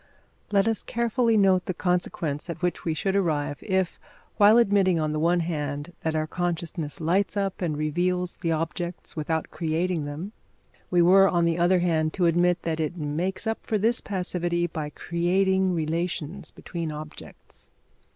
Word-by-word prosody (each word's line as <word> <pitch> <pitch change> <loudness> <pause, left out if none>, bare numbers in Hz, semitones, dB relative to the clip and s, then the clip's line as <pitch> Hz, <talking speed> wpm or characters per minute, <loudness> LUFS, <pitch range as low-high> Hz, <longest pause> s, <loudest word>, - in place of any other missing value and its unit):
Let 200 +1 +3
us 225 -1 +1
carefully 235 -1 +1
note 190 -3 +4
the 185 - -3
consequence 175 -4 -1
at 170 +1 -6
which 180 - -1
we 160 -2 0
should 195 +5 -1
arrive, 150 -7 0
if, 190 -3 -1 0.4
while 210 +2 +7
admitting, 195 -6 +3
on 155 -1 0
the 155 - -1
one 170 +2 +2
hand, 150 -1 -3
that 160 -1 -1
our 155 0 +1
consciousness 165 -2 -3
lights 185 +5 +1
up 195 -1 -2
and 160 -4 -1
reveals 180 +4 -1
the 165 -2 -1
objects 165 +2 -3
without 160 0 -2
creating 165 0 -1
them, 155 +8 -6 0.6
we 175 -1 +4
were, 195 +2 +6
on 170 -1 +2
the 170 0 +1
other 175 +1 +3
hand, 160 -3 +1
to 180 - +1
admit 175 +1 +2
that 165 -1 -2
it 160 +3 -2
makes 170 +7 -2
up 225 0 -1
for 215 - -1
this 225 +3 +2
passivity 175 -3 -1
by 155 -3 -4
creating 185 +3 +1
relations 165 +2 -3
between 170 -3 -5
objects. 150 0 -10
175 Hz, 165 wpm, -26 LUFS, 160-190 Hz, 0.6 s, while